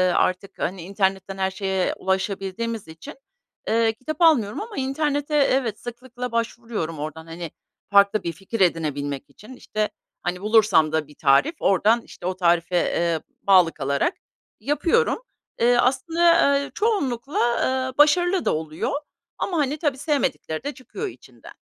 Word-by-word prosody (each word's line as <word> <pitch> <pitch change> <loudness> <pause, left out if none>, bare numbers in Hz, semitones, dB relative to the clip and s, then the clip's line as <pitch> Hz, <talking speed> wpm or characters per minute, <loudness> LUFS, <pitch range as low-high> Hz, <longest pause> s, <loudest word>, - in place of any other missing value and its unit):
artık, 185 +2 0
hani, 185 0 -2
internetten 195 +1 -1
her 190 0 0
şeye 190 -1 -1
ulaşabildiğimiz 195 +3 -2
için, 160 0 -10 0.6
ııı, 225 0 +3
kitap 295 +8 -6
almıyorum 260 - +4
ama 440 0 -8
internete 290 +2 -1
evet, 260 -6 +2
sıklıkla 245 0 -7
başvuruyorum 230 -8 -3
oradan, 155 +2 -6
hani, 165 -1 -7 0.4
farklı 200 +1 +5
bir 170 - -2
fikir 195 +6 -6
edinebilmek 145 -5 0
için. 255 +6 -13
İşte, 215 -3 -2 0.3
hani, 180 +1 -3
bulursam 210 -8 +4
da 160 -2 -1
bir 150 - -17
tarif 150 - +3
oradan, 215 +5 +3
işte, 175 - -12
o 185 0 -1
tarife, 175 -1 +2
eee, 170 -1 +1 0.2
bağlı 185 -4 +5
kalarak 140 - 0 0.5
yapıyorum. 335 - +1 0.4
Eee, 240 +1 +4
aslında, 325 +3 +3
eee, 280 - -5
çoğunlukla, 280 - -1 0.5
eee, 255 - -24
başarılı 350 +5 +4
da - - +2
oluyor 155 0 -3 0.5
ama, 355 - -2
hani, 295 0 0
tabii 290 -4 -1
sevmedikleri 280 - -1
de 285 +1 -3
çıkıyor 265 - -6
içinden. 380 - -13
215 Hz, 140 wpm, -23 LUFS, 180-275 Hz, 0.6 s, farklı